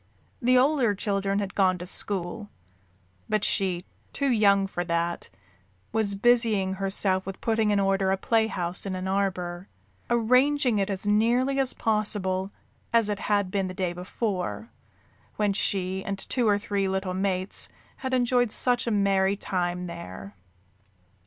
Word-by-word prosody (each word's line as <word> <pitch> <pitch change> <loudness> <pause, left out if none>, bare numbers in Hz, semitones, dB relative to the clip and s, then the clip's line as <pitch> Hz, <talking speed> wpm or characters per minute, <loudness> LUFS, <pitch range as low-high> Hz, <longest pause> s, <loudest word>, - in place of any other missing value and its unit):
The 250 +1 +4
older 255 -5 +3
children 195 -1 -1
had 200 -2 -2
gone 185 -2 +2
to 180 - -7
school, 195 +2 -2 0.8
but 215 -1 +1
she, 180 -2 -1 0.3
too 280 -2 0
young 200 -4 +4
for 175 -2 -3
that, 170 0 -2 0.6
was 215 -3 +1
busying 220 -3 +3
herself 190 -1 +1
with 195 - -6
putting 220 -2 +1
in 205 -1 +2
order 195 -1 +1
a 195 - +1
playhouse 200 -5 0
in 190 - -3
an 185 0 -4
arbor 185 -2 -2 0.4
arranging 250 +1 +3
it 195 - 0
as 195 0 -4
nearly 240 +6 +2
as 265 -2 +1
possible 200 -3 0 0.4
as 230 -2 +3
it 205 -1 -2
had 205 -3 +1
been 195 -1 0
the 185 - -7
day 180 -2 -1
before, 185 +4 -4 0.6
when 210 -1 +1
she 190 -1 -2
and 200 0 -3
two 240 +4 -1
or 205 -1 +4
three 200 -2 -1
little 190 -1 -2
mates 190 0 -1 0.3
had 260 - -4
enjoyed 245 -2 +2
such 245 +1 +2
a - - +1
merry 200 -1 +2
time 180 -2 -2
there. 100 - -8
200 Hz, 150 wpm, -26 LUFS, 185-225 Hz, 0.8 s, The